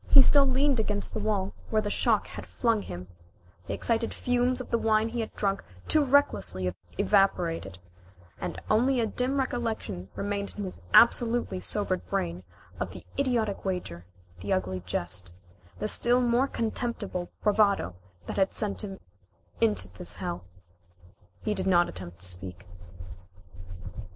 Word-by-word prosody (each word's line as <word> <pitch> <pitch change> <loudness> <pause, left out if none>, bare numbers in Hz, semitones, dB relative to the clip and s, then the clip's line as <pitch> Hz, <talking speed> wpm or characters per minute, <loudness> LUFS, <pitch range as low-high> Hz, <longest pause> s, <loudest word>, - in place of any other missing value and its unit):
He 275 - +9
still 280 0 +5
leaned 265 0 +2
against 210 -2 -1
the - - -2
wall, 200 -3 -1 0.2
where 215 -1 +2
the 205 - -2
shock - - +2
had - - -9
flung 230 -3 +1
him. 90 - -7 0.6
The - - -2
exciting 230 0 +1
fumes 250 +1 +1
of 255 - -7
the 235 - +2
wine 220 0 +2
he 240 +1 -4
had 225 - -3
drunk 195 -1 0 0.2
too 310 - +5
recklessly 95 - +2 0.2
evaporated, 170 - +2 0.6
and - - -4
only 250 +4 +3
a 230 - +2
dim 250 +5 -1
recollection 230 - -2
remained 200 0 -3
in 205 - -3
his 185 - -7
absolutely 235 -4 +5
sobered 185 -2 0
brain 85 +1 -1 0.4
of 95 - -2
the - - -11
idiotic 235 -7 0
wager, 100 - -4 0.3
the 100 +3 -4
ugly 95 0 0
jest, 90 0 -3 0.4
the 210 - -2
still 240 +3 +4
more 245 +2 +3
contemptible 220 -7 -2
bravado 205 - +3 0.3
that - - -5
had 195 -1 +2
sent 210 -2 0
him 195 -2 -6 0.6
into 105 -4 +3
this 90 -1 -9
hell. 90 +1 -4 1.0
He 215 - 0
did 190 -2 -3
not 175 -2 +5
attempt 85 -2 -9
to - - -8
speak. 90 +1 -8
205 Hz, 150 wpm, -28 LUFS, -, 1.0 s, He